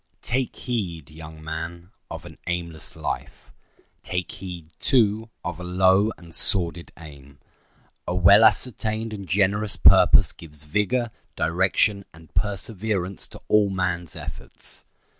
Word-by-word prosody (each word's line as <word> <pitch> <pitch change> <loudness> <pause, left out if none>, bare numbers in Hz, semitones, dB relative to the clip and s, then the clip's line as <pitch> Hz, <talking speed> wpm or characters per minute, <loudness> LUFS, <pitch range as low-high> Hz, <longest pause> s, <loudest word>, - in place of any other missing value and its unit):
Take 130 +1 -1
heed, 90 - -4
young 80 0 -11
man, 85 +3 -6 0.2
of - - -7
an - - -12
aimless 85 -3 -4
life. - - -5 0.5
Take 90 -2 -3
heed, 90 -3 -8
too, 110 -3 +2 0.2
of 90 -1 -4
a - - -6
low 95 +4 +3
and 85 -2 -14
sordid 85 -3 +2
aim. 70 -4 -13 0.7
A 90 - -1
well 100 +4 +7
ascertained 110 -1 +1
and 100 -4 -7
generous 100 +2 +2
purpose - - +6
gives 75 -2 -11
vigor, 105 +8 0 0.2
direction, 95 +5 +2
and 80 -1 -17
perseverance 100 0 -2
to - - -12
all 105 -1 +4
man's 90 -4 -2
efforts. - - -7
90 Hz, 125 wpm, -24 LUFS, 85-105 Hz, 0.7 s, well